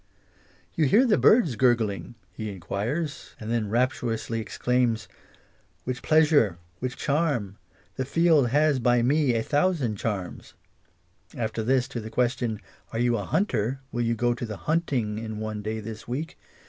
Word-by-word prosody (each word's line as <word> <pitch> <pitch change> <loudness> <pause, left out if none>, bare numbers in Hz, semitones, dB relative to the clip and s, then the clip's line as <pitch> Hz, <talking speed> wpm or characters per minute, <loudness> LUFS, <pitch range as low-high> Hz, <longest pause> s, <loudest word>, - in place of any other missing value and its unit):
"You 160 - +2
hear 225 - +5
the 220 -4 +4
bird's 210 - +5
gurgling?" 120 -2 +1 0.2
he 110 +3 -5
enquires, 110 - -4
and 110 +1 -5
then 115 -3 0
rapturously 115 -1 -1
exclaims 115 0 0 0.4
" - - -37
Which 125 0 -4
pleas 155 0 +4
ure! 110 - +4 0.2
which 125 0 -4
charm! 140 - -1 0.4
The 130 - -1
field 160 -3 +3
has 145 +1 +3
by 120 0 +3
me 140 -1 +2
a 115 - 0
thousand 145 - +1
charms 100 -4 -4 0.4
"; - - -40
after 110 -1 -2
this, 130 +2 +2
to 125 - -4
the 110 0 -7
question 120 -2 0 0.2
" - - -32
Are - - -4
you 120 0 +2
hunter? 130 - -1
will 120 - -2
you 115 0 +1
go 120 +2 +1
to 120 - -5
the 110 -2 -6
hunting 130 -10 0
in 110 -1 -5
one 110 -1 -4
day 110 +1 -3
this 110 0 -8
week 145 +7 -4
120 Hz, 165 wpm, -26 LUFS, 110-140 Hz, 0.4 s, hear